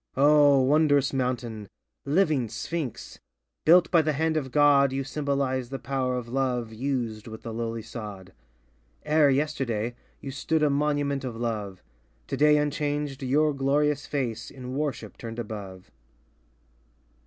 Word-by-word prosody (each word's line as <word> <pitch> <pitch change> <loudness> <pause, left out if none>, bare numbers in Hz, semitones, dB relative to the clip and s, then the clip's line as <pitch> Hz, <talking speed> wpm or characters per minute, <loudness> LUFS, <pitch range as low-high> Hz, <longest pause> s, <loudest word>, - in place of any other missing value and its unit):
O 145 0 +6
Wondrous 145 0 +3
mountain 120 -5 -2 0.2
— - - -57
living 155 - +2
Sphinx! 135 +4 -5 0.5
Built 175 +2 +6
by 170 -3 +6
the 155 -1 0
hand 160 +2 0
of 135 -4 -2
God, 145 -2 +5
You 135 +1 -2
symbolize 135 -3 -1
the 135 - -4
power 130 0 -2
of 125 -2 -4
Love 125 -3 -1
Used 120 -3 -3
with 110 0 -9
the 115 - -6
lowly 115 0 -3
sod, 105 -5 -8 0.7
E'er 150 -1 +4
yesterday, 130 -6 -1 0.3
you 135 - -6
stood 155 +3 0
a 150 - +3
monument 145 -1 0
of 125 -3 -4
Love, 110 -5 -4 0.4
Today 150 - +3
unchanged, 145 -1 -2
your 145 +3 +2
glorious 145 +1 +1
face, 120 -6 -3
In 130 -1 -8
worship 145 -1 -4
turned 115 -1 -7
above. 105 -4 -7
135 Hz, 140 wpm, -26 LUFS, 115-145 Hz, 0.7 s, O